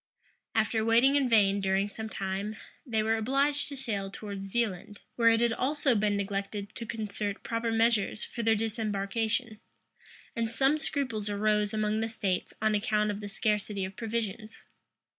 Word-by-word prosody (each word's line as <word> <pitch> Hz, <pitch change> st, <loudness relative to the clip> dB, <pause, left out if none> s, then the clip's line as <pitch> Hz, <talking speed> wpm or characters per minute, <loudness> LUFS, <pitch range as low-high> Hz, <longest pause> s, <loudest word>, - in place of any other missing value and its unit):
After 220 Hz, 0 st, +2 dB
waiting 235 Hz, +5 st, +5 dB
in 275 Hz, -3 st, +3 dB
vain 200 Hz, -3 st, +4 dB
during 195 Hz, +1 st, +1 dB
some 220 Hz, +2 st, -6 dB
time, 195 Hz, +2 st, -3 dB, 0.3 s
they 220 Hz, -3 st, +1 dB
were 220 Hz, +1 st, +2 dB
obliged 275 Hz, +5 st, +1 dB
to 280 Hz, -, -7 dB
sail 205 Hz, -7 st, -3 dB
towards 200 Hz, -1 st, -6 dB
Zealand, 205 Hz, -2 st, -2 dB
where 230 Hz, -1 st, +5 dB
it 225 Hz, 0 st, +3 dB
had 235 Hz, -1 st, +3 dB
also 280 Hz, +1 st, +1 dB
been 205 Hz, -2 st, +2 dB
neglected 200 Hz, +1 st, -3 dB
to 230 Hz, -, -6 dB
concert 210 Hz, -2 st, -3 dB
proper 230 Hz, 0 st, -1 dB
measures 225 Hz, -2 st, +2 dB
for 235 Hz, -, -5 dB
their 225 Hz, -1 st, +4 dB
disembarkation; 220 Hz, +1 st, -1 dB, 0.8 s
and 230 Hz, -2 st, 0 dB
some 270 Hz, +6 st, +2 dB
scruples 255 Hz, -9 st, -2 dB
arose 210 Hz, 0 st, +1 dB
among 215 Hz, 0 st, 0 dB
the 225 Hz, 0 st, -1 dB
states 195 Hz, -5 st, -2 dB
on 215 Hz, 0 st, +3 dB
account 210 Hz, 0 st, +1 dB
of 205 Hz, -, -5 dB
the 205 Hz, -1 st, -6 dB
scarcity 210 Hz, -2 st, -1 dB
of 190 Hz, +1 st, -8 dB
provisions. 220 Hz, -1 st, -4 dB
215 Hz, 160 wpm, -29 LUFS, 205-230 Hz, 0.8 s, waiting